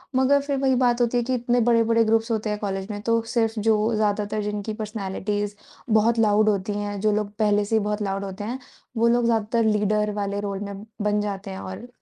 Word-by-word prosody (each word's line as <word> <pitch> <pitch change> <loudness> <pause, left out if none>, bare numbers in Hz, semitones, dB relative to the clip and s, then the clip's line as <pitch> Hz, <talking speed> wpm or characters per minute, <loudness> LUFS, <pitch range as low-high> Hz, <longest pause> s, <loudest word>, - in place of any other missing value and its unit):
मगर 265 +2 +4
फिर 280 0 -2
वही 265 -1 +2
बात 245 -1 +2
होती 240 0 +2
है 240 - +1
कि 260 +2 -2
इतने 245 0 +1
बड़े-बड़े 230 0 +3
ग्रुप्स 225 +1 +1
होते 220 -1 -1
हैं 210 - -1
कॉलेज 195 -2 -3
में 205 - -5
तो 230 +1 +1
सिर्फ़ 225 -2 +1
जो 220 +1 +2
ज़्यादातर 210 0 0
जिनकी 210 +1 -3
पर्सनैलिटीज़ 205 -1 -3 0.4
बहुत 225 +2 +3
लाउड 215 -1 +4
होती 200 0 -1
हैं, 205 -1 -3
जो 215 0 +3
लोग 210 -1 -1
पहले 210 -1 +3
से 225 - 0
ही - - +4
बहुत 210 0 -2
लाउड 195 -1 -2
होते 195 +1 -6
हैं, 240 +5 -4 0.4
वो 230 +1 +3
लोग 240 0 +3
ज्यादातर 230 0 +1
लीडर 210 0 +1
वाले 200 -1 -2
रोल 200 -1 -3
में 200 0 -6 0.2
बन 210 0 +1
जाते 200 -1 -4
हैं 190 - -6
और 185 +6 -7
215 Hz, 220 wpm, -24 LUFS, 205-230 Hz, 0.4 s, मगर